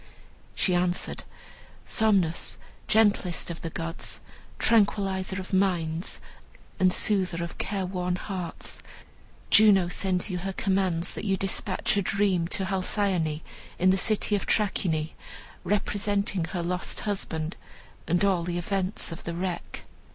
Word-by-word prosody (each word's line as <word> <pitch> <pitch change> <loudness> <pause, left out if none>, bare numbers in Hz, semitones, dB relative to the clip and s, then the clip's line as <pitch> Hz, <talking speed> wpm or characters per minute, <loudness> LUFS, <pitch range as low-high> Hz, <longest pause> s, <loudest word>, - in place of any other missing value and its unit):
She 185 - +1
answered, 175 0 0 0.6
"Somnus, 195 -7 +2 0.3
gentlest 205 -6 +2
of 170 - -7
the 165 - -4
gods, 165 +1 -3 0.4
tranquillizer 195 -3 +2
of 185 +1 -8
minds 175 -3 0 0.6
and 185 -1 +5
soother 180 -3 +2
of 170 - -7
care 195 -2 -1
worn 180 -1 -1
hearts, 180 -2 -5 0.7
Juno 200 -5 +6
sends 180 0 +1
you 180 - -2
her 195 +2 -3
commands 190 -3 0
that - - -5
you 195 -2 +1
despatch 195 +1 0
a - - +3
dream 190 -3 +1
to 190 +1 -1
Halcyone, 185 -4 0 0.4
in 185 +1 +4
the - - +4
city 210 +2 +1
of 200 - -3
Trachine, 165 -7 +1 0.5
representing 205 -3 0
her 170 +1 -3
lost 180 +1 -1
husband 165 -5 -2 0.5
and 175 +3 +2
all 190 -3 +3
the 175 0 -2
events 190 +2 -1
of 165 - -7
the 170 - -4
wreck." 180 0 -4
185 Hz, 130 wpm, -27 LUFS, 175-200 Hz, 0.7 s, Juno